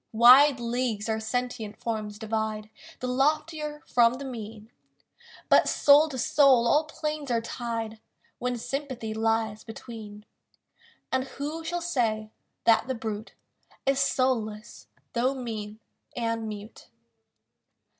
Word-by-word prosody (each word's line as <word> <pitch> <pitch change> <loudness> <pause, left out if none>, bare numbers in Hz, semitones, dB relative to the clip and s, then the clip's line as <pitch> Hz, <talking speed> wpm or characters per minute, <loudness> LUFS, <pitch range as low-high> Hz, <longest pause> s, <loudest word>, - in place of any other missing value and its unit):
Wide 255 +4 +8
leagues 235 -3 -1
our 220 0 0
sentient 225 -1 -3
forms 215 -2 -3
divide 220 -1 -3 0.3
The 255 - -2
loftier 300 +3 0
from 235 0 +4
the 275 +2 -7
mean; 225 -3 -8 0.8
But - - +5
soul 295 +2 +6
to 265 - -6
soul 255 -1 +4
all 300 +6 +4
planes 305 -1 -4
are 235 -1 +2
tied 230 -1 -4 0.4
When 250 0 -1
sympathy 260 -3 -4
lies 220 -1 0
between; 220 -2 -10 0.9
And 260 0 +1
who 295 +4 -5
shall 350 +2 -2
say 225 -10 -1 0.3
that 230 0 +4
the 260 - -1
brute 220 -1 -5 0.5
Is 275 0 +2
soulless, 225 -6 -1 0.3
though 255 +3 +1
mean 220 -4 -6 0.4
and 230 -2 -2
mute? 210 +1 -9
235 Hz, 120 wpm, -27 LUFS, 220-270 Hz, 0.9 s, Wide